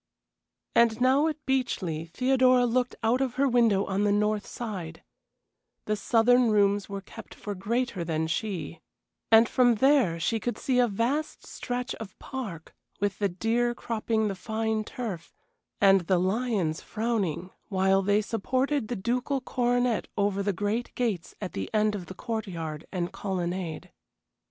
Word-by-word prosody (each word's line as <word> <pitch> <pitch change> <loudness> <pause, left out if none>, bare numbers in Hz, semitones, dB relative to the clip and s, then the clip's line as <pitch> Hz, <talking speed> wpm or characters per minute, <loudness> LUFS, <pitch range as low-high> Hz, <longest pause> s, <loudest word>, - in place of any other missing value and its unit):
And 230 -1 +4
now 265 +5 +4
at 310 -1 -4
Beechleigh 185 -12 -1
Theodora 255 +3 +3
looked 245 +1 0
out 235 +4 +2
of 260 -3 -1
her 275 +1 +3
window 230 -6 +3
on 195 +1 0
the 205 - +3
north 210 0 +1
side 185 -9 -6 0.8
the 215 - 0
southern 235 +3 +4
rooms 205 -1 +2
were 200 0 -5
kept 225 +3 -12
for 205 - -5
greater 205 0 -2
than 160 -1 -1
she 175 -1 -3 0.5
and 225 +1 +7
from 245 -1 +4
there 245 - +3
she 225 +7 0
could 240 +2 -3
see 255 -2 +1
a 245 - +5
vast 240 +9 -2
stretch 245 +1 -4
of 215 -4 -9
park, 205 - -7 0.3
with 200 -1 -1
the 200 -1 +1
deer 230 +6 0
cropping 220 -1 -1
the 200 - -1
fine 220 +3 -2
turf, 210 -8 -6 0.4
and 195 -1 +6
the 185 - +3
lions 190 -3 0
frowning 205 -6 -2 0.2
while 190 -1 +3
they 205 +2 +2
supported 255 +4 -1
the 245 - -3
ducal 250 +7 -1
coronet 245 -2 0
over 200 -1 +1
the 200 +1 +1
great 210 +5 -2
gates 215 -9 -2
at 190 -3 -5
the 95 -1 -4
end 215 0 +3
of 190 -4 -5
the 190 - -8
court 220 +1 -4
yard 160 -4 -6
and 180 0 -3
colonnade. 180 -4 -3
215 Hz, 155 wpm, -27 LUFS, 190-245 Hz, 0.8 s, and